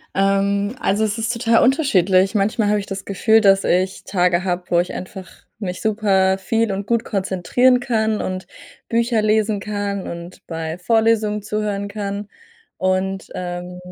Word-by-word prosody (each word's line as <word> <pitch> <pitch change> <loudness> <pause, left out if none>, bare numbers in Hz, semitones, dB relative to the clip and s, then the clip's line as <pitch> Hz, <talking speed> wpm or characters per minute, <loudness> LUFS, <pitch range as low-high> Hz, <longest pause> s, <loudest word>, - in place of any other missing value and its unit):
Ähm, 200 +2 +1
also, 210 +3 +1
es 215 +1 -2
ist 225 +1 -1
total 230 -1 +2
unterschiedlich. 195 - +3
Manchmal 210 +1 +1
habe 210 0 +2
ich 200 - -8
das 195 0 -6
Gefühl, 220 +3 +3
dass 195 -2 +4
ich 185 +1 0
Tage 180 -1 +1
habe, 180 -1 -2
wo 170 0 +3
ich 180 - -3
einfach 185 0 -8 0.3
mich 185 -2 -4
super 195 -3 +2
viel 225 +2 0
und 200 +1 -4
gut 235 -1 +1
konzentrieren 200 +6 +2
kann 220 -3 0
und 185 0 -4 0.4
Bücher 230 -1 +1
lesen 215 -1 +1
kann 205 -1 -3
und 170 +1 -9
bei 165 0 -5
Vorlesungen 220 +1 +1
zuhören 210 -1 -2
kann 200 0 -5 0.5
und, 185 +1 -1
ähm, 180 0 -5
200 Hz, 155 wpm, -20 LUFS, 185-220 Hz, 0.5 s, dass